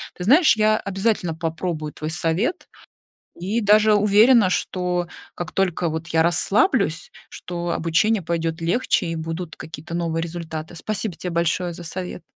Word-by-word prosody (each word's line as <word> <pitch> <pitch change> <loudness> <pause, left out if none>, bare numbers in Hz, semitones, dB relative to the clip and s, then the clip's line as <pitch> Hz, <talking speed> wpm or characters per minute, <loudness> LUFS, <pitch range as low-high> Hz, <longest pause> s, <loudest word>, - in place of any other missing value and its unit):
Ты 180 - -6
знаешь, 300 - +6
я 215 0 +3
обязательно 195 -3 -1
попробую 160 -2 -4
твой 155 +1 -5
совет 170 - -1 0.7
и 200 +6 -1
даже 215 0 +5
уверена, 210 +1 +5
что 180 -1 -1 0.3
как 175 - -5
только 180 -3 0
вот 160 +1 -4
я 160 -1 +3
расслаблюсь, 195 - +1 0.2
что 175 -1 -5
обучение 190 +6 +1
пойдёт 165 0 -2
легче 175 +4 +1
и 165 0 -3
будут 165 +1 -5
какие-то 160 +1 -9
новые 165 -1 -1
результаты. 165 -1 -6
Спасибо 215 +1 -3
тебе 180 - -5
большое 170 +1 0
за 175 - -8
совет. 180 +2 -5
175 Hz, 145 wpm, -22 LUFS, 165-205 Hz, 0.7 s, знаешь